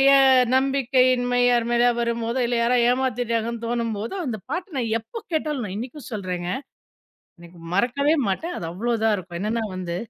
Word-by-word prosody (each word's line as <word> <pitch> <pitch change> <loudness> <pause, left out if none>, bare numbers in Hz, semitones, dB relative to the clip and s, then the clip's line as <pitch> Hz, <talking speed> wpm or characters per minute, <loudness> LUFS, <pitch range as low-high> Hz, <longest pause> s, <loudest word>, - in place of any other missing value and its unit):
என் 260 -2 +5
நம்பிக்கையின்மை 255 -2 +2
யார் 240 -1 +2
மேலயா 240 +1 +4
வரும்போதோ, 235 +1 -1
இல்ல 240 0 0
யாரோ 240 +2 +3
ஏமாத்திட்டாங்கன்னு 235 -2 -1
தோணும்போதோ, 230 - -2
அந்த 220 -4 -3
பாட்ட 355 +3 -2
நான் 225 -2 -1
எப்ப 450 - -9
கேட்டாலும் 300 -6 -1
நான் 185 - -6
இன்னிக்கும் 255 +6 -7
சொல்றேங்க 180 -4 -3 0.9
இன்னைக்கு 170 0 -14 0.2
மறக்கவே 270 +9 +2
மாட்டேன். 330 - -2
அது 165 - -5
அவ்வளோதான் 225 +2 +1
இருக்கும். 175 -2 -7
என்னன்னா 225 +2 -1
வந்து 175 -2 -4
235 Hz, 150 wpm, -23 LUFS, 220-260 Hz, 0.9 s, என்